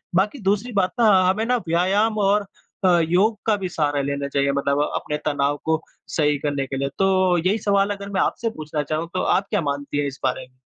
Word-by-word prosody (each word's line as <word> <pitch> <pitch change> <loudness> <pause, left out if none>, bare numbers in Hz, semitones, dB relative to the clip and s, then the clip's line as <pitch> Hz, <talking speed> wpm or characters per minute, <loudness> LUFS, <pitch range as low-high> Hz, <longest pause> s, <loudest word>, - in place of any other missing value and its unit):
बाकी 210 +9 +1
दूसरी 210 +5 0
बात 185 - +1
ना, 230 - +5 0.2
हमें 210 +4 0
ना 250 +1 +2
व्यायाम 195 +6 +2
और 205 +1 +2 0.4
अ, 175 -2 +5
योग 205 +5 +3
का 220 -2 +3
भी 185 - -1
सहारा 145 -4 0
लेना 140 0 -2
चाहिए 140 0 +1
मतलब 140 0 0 0.2
अपने 150 - -2
तनाव 145 -1 0
को 160 0 +1 0.4
सही 150 -2 +2
करने 140 -2 -1
के 135 - -4
लिए। 140 +1 -1
तो, 185 -2 +3
यही 185 +6 +1
सवाल 200 0 +3
अगर 200 0 -8
मैं 190 - +1
आपसे 230 - 0
पूछना 155 -1 -3
चाहूँ, 155 +3 -3
तो 185 - 0
आप 195 - +1
क्या 205 -5 0
मानती 145 0 -3
है 145 0 0
इस 140 0 -7
बारे? 130 - -2
170 Hz, 215 wpm, -22 LUFS, 145-200 Hz, 0.4 s, ना